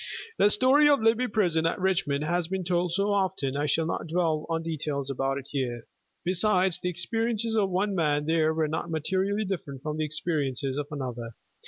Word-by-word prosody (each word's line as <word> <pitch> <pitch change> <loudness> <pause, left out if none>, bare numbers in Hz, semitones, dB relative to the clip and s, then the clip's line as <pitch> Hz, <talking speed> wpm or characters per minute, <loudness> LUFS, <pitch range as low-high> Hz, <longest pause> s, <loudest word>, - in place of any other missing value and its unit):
The 205 - +6
story 265 +8 +5
of 285 - +4
Libby 230 +3 +3
Prison 170 -7 +1
at 165 - -2
Richmond 175 -6 0
has 170 +1 0
been 190 +1 -3
told 175 0 0
so 200 +3 +1
often 185 -9 -1
I 145 +1 0
shall 160 +2 +2
not 165 - -3
dwell 160 -2 0
on 165 0 -1
details 145 -4 -3
about 135 +1 -1
it 140 - -7
here. 120 -4 -3 0.4
Besides, 185 0 +2
the 180 - -2
experiences 225 +5 0
of 205 -3 +2
one 195 +3 0
man 150 -4 +1
there 160 0 +2
were 160 -1 0
not 160 +3 -3
materially 190 +6 -1
different 145 -8 -5
from 155 0 -3
the 155 - 0
experiences 145 -3 -1
of 145 - -4
another. 125 -5 -6
165 Hz, 190 wpm, -27 LUFS, 145-190 Hz, 0.4 s, The